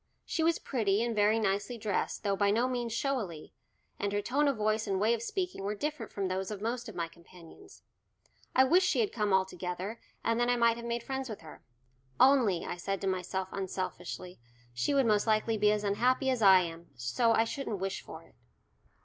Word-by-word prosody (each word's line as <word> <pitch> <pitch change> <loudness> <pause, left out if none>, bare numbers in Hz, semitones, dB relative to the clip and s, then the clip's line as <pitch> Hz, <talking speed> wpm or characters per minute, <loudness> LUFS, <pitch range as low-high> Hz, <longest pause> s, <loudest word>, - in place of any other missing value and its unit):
She 330 - -2
was 330 +1 +3
pretty 215 -4 0
and 235 -1 -1
very 210 +1 +3
nicely 205 +2 -1
dressed, 210 -2 -2
though 200 -2 +1
by 200 0 +2
no 230 +5 +2
means 245 -2 -2
showily, 225 - -3 0.5
and 200 - -1
her 205 0 0
tone 285 +6 +1
of 275 -4 +1
voice 215 +1 0
and 195 -1 0
way 220 +3 +3
of 230 - -2
speaking 360 - -3
were 205 +2 -2
different 290 -1 -4
from 195 -2 -2
those 185 +1 -2
of 210 -2 -5
most 235 +2 -3
of 210 - -10
my 170 -1 -2
companions. 170 - -16 0.7
I 260 - +7
wished 355 +8 +4
she - - +1
had 415 - -1
come 210 -3 0
altogether, 190 +2 -1 0.2
and 230 0 +1
then 240 0 +2
I 245 - +4
might 235 -1 +3
have 235 0 -6
made 235 0 -2
friends 265 -1 -4
with 215 - -7
her. 160 -2 -12 0.6
"Only," 245 -10 +4
I - - -4
said 195 +2 -3
to - - -3
myself 185 0 -2
unselfishly, 185 -2 -5 0.3
"she 205 - 0
would 270 -2 +4
most 210 -1 +2
likely 220 +1 +2
be 210 0 +3
as 210 0 0
unhappy 250 +6 +2
as 250 -3 -1
I 190 -2 +8
am, 170 0 -6
so 120 - +1
I 225 - +4
shouldn't 230 -2 -4
wish 195 +1 -3
for - - -10
it." - - -22
215 Hz, 210 wpm, -31 LUFS, 190-240 Hz, 0.7 s, I